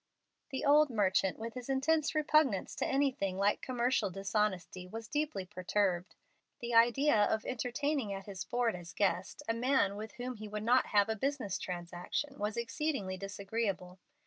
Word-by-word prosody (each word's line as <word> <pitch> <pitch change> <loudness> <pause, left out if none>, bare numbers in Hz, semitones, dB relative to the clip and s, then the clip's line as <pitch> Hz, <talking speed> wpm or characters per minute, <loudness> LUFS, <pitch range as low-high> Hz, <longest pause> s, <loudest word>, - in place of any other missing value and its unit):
The 265 -1 -3
old 295 +1 +6
merchant, 195 -4 +2
with 230 +1 -5
his 250 0 -7
intense 300 +4 +1
repugnance 305 -8 +3
to - - 0
anything 260 -9 0
like 200 +1 +2
commercial 245 -4 +1
dishonesty, 195 -1 -2
was 225 +4 -7
deeply 295 -10 -2
perturbed. 185 0 -1 0.4
The 240 0 -4
idea 240 +3 +5
of 220 +1 -1
entertaining 255 0 -1
at 195 -1 -5
his 200 -1 -5
board 240 -3 0
as 175 0 -9
guest 200 +6 0
a 225 - +2
man 235 -4 +2
with 215 +1 -7
whom 250 -1 -5
he 215 0 -7
would 210 0 -4
not 245 +3 +4
have 205 -1 +4
a 220 - -1
business 255 -4 -2
transaction 180 +10 -4
was 210 +2 -2
exceedingly 235 -5 -2
disagreeable. 195 -1 -3
220 Hz, 160 wpm, -33 LUFS, 195-260 Hz, 0.4 s, old